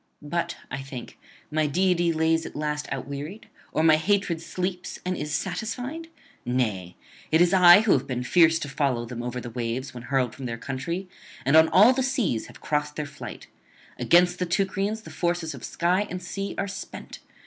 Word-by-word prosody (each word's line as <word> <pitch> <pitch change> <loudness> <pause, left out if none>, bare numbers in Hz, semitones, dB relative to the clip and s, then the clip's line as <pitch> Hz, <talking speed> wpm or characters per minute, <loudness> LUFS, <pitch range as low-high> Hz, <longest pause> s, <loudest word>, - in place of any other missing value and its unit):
But, 170 +3 -2
I 140 +1 -3
think, 135 -3 -9 0.3
my 155 0 +1
deity 175 +2 +2
lies 160 0 +2
at - - -11
last 150 0 -2
outwearied, 140 +9 -5 0.3
or 155 - +1
my 160 -1 +6
hatred 180 -1 +1
sleeps 180 +1 -4
and 185 0 -1
is 150 -2 -4
satisfied? 245 - -3 0.4
Nay, 105 -8 -1 0.4
it 160 - +5
is 175 +1 +4
I 180 +1 +9
who 220 - +2
have 135 0 +2
been 125 -2 -2
fierce 165 +3 +5
to 145 - -3
follow 130 -4 0
them 120 0 -6
over 125 +1 -4
the 120 -1 -7
waves 120 +3 -3
when 120 - -8
hurled 130 -4 +1
from 135 -2 -6
their 115 -1 -4
country, 140 +10 -4 0.4
and 140 +3 +4
on 160 0 +7
all 215 +7 +7
the 265 - 0
seas 245 - 0
have - - -15
crossed 150 0 -1
their 150 - -3
flight. 145 -1 -9 0.5
Against 175 +1 +4
the 180 - -1
Teucrians 195 +4 0
the - - -10
forces 175 -2 -1
of - - -10
sky 180 +4 0
and 180 - -4
sea 195 +2 -5
are 200 - -1
spent. 190 - -8
160 Hz, 190 wpm, -26 LUFS, 135-185 Hz, 0.5 s, I